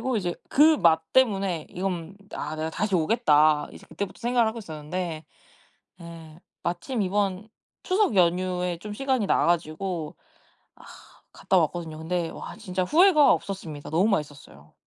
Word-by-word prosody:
그래가지고 260 -2 -1
이제 175 -4 -2
그 310 +2 +5
맛 160 - +4
때문에 195 -10 +2
'이건 180 -1 -4 0.2
아 150 +2 -4
내가 160 +1 -3
다시 205 +3 -2
오겠다.' 155 -5 +3
이제 - - -13
그때부터 200 -2 -6
생각을 240 -1 +2
하고 220 +1 -5
있었는데, 160 -2 -5 0.8
예 165 -1 -11 0.2
마침 175 +7 -2
이번 195 +1 -1 0.3
추석 380 - +1
연휴에 180 0 +1
좀 210 +4 -8
시간이 260 -3 0
나가지고 170 -1 -1 0.6
아 - - -18 0.5
갔다 190 - +1
왔거든요. 160 -1 -1
근데 170 +1 -2
와 - - -8
진짜 185 -4 -3
후회가 315 - +5
없었습니다. 165 -4 -6
너무 175 +6 +2
맛있었어요. 140 - -4
180 Hz, 330 characters per minute, -25 LUFS, 160-210 Hz, 0.8 s, 그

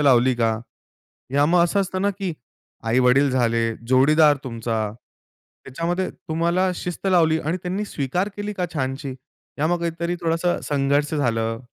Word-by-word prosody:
लावली 130 -3 +4
का? 115 -2 +1 0.8
या 145 - +4
मग 170 +2 +4
असं 200 +4 +1
असतं 190 -1 -2
ना, 200 - +2
की 195 -3 -4 0.5
आई-वडील 125 +4 +4
झाले, 115 -2 +1 0.3
जोडीदार 145 +4 +5
तुमचा, 115 -3 -2 0.8
त्याच्यामध्ये 170 +7 -2
तुम्हाला 170 +4 0
शिस्त 180 +2 -5
लावली 165 -4 +4
आणि 160 +4 -1
त्यांनी 190 +4 -2
स्वीकार 175 +4 -2
केली 205 0 -4
का 185 -3 -2
छानशी? 135 -1 -3 0.4
या 150 - +2
मग 175 +1 +1
काहीतरी 170 +1 -2
थोडंसं 165 +1 0
संघर्ष 145 +2 +1
झालं? 115 -5 0
155 Hz, 145 wpm, -23 LUFS, 130-175 Hz, 0.8 s, जोडीदार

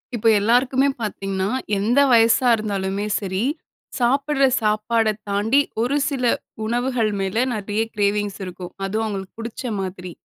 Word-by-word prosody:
இப்ப 225 - 0
எல்லாருக்குமே 255 +5 +3
பார்த்தீங்கன்னா, 195 -2 -2 0.3
எந்த 225 +7 +2
வயசா 230 +2 +5
இருந்தாலுமே 200 -2 -2
சரி, 190 +1 -2 0.6
சாப்புட்ற 275 +3 +2 0.2
சாப்பாட 215 +1 +1 0.2
தாண்டி 210 +7 +2 0.2
ஒரு 260 +5 +1
சில 270 -3 -3 0.4
உணவுகள் 240 -1 0
மேல 195 +5 0
நிறைய 210 +1 -2
கிரேவிங்ஸ் 205 0 0
இருக்கும். 180 0 -8
அதுவும் 215 +3 -1
அவுங்களுக்கு 195 -2 -6
புடிச்ச 230 +2 -6 0.2
மாதிரி. 185 -1 -6
215 Hz, 125 wpm, -22 LUFS, 195-240 Hz, 0.6 s, வயசா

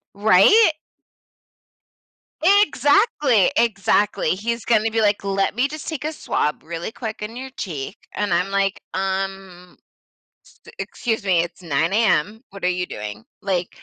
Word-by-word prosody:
Right? 220 - +6 1.7
Exactly, 295 - +4
exactly, 205 -5 +1
he's 230 +5 -2
gonna 225 -1 +2
be 225 - 0
like, 205 -1 +2
"Let 195 0 0
me 250 +5 +1
just 310 0 -8
take 315 -2 -5
a 310 - -2
swab 150 - -2
really 170 +4 -5
quick 220 -2 -7
in 225 +3 -6
your 265 +1 -7
cheek," 160 -1 -5 0.2
and 205 -4 0
I'm 180 +3 0
like, 195 0 0
"Um, 190 -1 -4 0.9
s - - -13
excuse 225 -4 -3
me, 180 -3 +3
it's 175 +1 -8
9:00 165 +3 0
AM, 215 - +1
what 195 0 -12
are 180 - +3
you 180 0 -1
doing?" 105 +1 -7 0.2
Like 185 -3 -1
200 Hz, 145 wpm, -21 LUFS, 180-235 Hz, 1.7 s, Right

